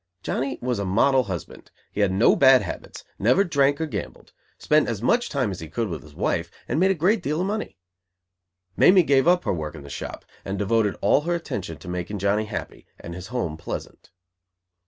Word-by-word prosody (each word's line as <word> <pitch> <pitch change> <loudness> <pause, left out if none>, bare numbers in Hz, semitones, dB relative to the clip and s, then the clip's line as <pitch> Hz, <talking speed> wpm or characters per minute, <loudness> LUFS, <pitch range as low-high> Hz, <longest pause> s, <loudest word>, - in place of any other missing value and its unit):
Johnny 135 0 -2
was 125 -4 -1
a - - -1
model 125 +7 +3
husband. 95 -5 -7 0.2
He 105 - -2
had 100 -2 +3
no 95 +5 +4
bad 130 -4 +6
habits, 85 - -7 0.2
never 125 - +4
drank 140 -5 +2
or 160 - 0
gambled, 155 - -7 0.2
spent 150 -3 +2
as 115 -4 -2
much 235 - +1
time 130 -8 0
as 95 - -6
he 80 - -8
could 110 +6 -2
with 80 -3 -5
his 75 -1 -16
wife, - - -1 0.2
and 155 - 0
made 190 +2 +4
a 195 - +2
great 190 +7 +2
deal 150 +3 -1
of 180 - 0
money. 210 - -3 1.0
Mamie 185 -1 +6
gave 140 -1 +3
up 180 0 +4
her - - 0
work 75 -2 -5
in 75 - -10
the 70 - -10
shop, - - -7 0.2
and 95 +1 -4
devoted 105 -1 +1
all 105 +8 +4
her 170 +3 -1
attention 95 - -5
to - - -13
making 90 +3 -4
Johnny 100 +2 +1
happy 105 0 -7
and 85 - -8
his 90 +1 -8
home 115 -11 -3
pleasant. 85 - -7
115 Hz, 210 wpm, -24 LUFS, 95-150 Hz, 1.0 s, bad